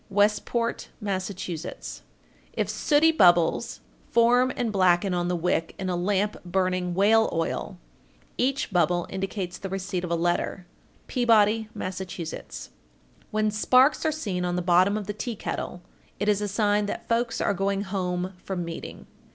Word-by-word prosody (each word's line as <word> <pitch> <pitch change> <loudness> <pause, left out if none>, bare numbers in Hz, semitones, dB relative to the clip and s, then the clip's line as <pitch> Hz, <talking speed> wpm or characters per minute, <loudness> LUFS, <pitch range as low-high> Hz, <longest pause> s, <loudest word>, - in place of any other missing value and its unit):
Westport, 210 +3 0
Mass. 195 -3 -2
1458. 180 -3 -6 0.5
If - - -1
sooty 305 +2 +3
bubbles 175 - +3 0.3
form 245 +2 +4
and 235 -3 -1
blacken 185 -1 +3
on 175 0 0
the 180 - 0
wick 165 -1 -1
in 190 -1 -3
a 180 - 0
lamp 200 +3 0
burning 180 0 -1
whale 220 +4 +4
oil, 170 +3 -2 0.6
each 265 0 0
bubble 175 0 +2
indicates 190 -2 -4
the 195 - -5
receipt 190 -1 -3
of 180 - -3
a 170 - +1
letter. 175 +2 -1 0.4
Peabody, 225 -3 +3
Mass. 185 0 -4
1459. 180 -3 -7 0.6
When 215 0 +1
sparks 255 +6 +4
are 315 - +2
seen 205 -13 -3
on 175 0 -1
the 180 - -1
bottom 185 +4 +4
of 210 - -4
the 205 - -4
tea 225 +3 -4
kettle, 180 -3 -5 0.4
it 205 - -1
is 210 -1 +2
a 205 - -1
sign 205 0 +1
that - - -5
folks 230 0 0
are - - +1
going 195 +1 -1
home 185 -2 -2
from 180 -3 -3
meeting. 165 0 -7
195 Hz, 160 wpm, -26 LUFS, 180-215 Hz, 0.6 s, form